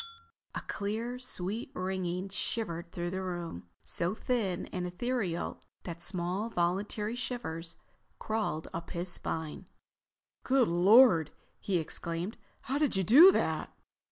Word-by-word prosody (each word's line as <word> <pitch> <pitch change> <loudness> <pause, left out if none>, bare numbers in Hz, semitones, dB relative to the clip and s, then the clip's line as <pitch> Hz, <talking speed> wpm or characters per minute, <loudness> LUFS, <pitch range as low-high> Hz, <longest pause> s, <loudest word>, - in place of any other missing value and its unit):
A - - -2
clear, 225 +5 -3
sweet 215 -3 -2
ringing 185 0 -2
shivered 175 -3 -3
through 175 0 -3
the 190 +1 -2
room—so 170 - -3
thin 215 -8 -1
and 180 -1 -2
etherial 185 -2 -2 0.2
that 170 -1 -6
small 180 +4 -2
involuntary 210 +2 -1
shivers 165 -10 -4 0.4
crawled 215 -8 -2
up 165 0 -5
his 175 +1 -3
spine. 160 -3 -3 0.8
"Good 260 -2 +4
Lord!" 180 - +6 0.3
he 190 -3 0
exclaimed. 170 +4 -3 0.2
"How 270 +3 -1
did 300 -7 +2
you 190 - +2
do 300 - +9
that?" - - -1
185 Hz, 120 wpm, -31 LUFS, 170-225 Hz, 0.8 s, do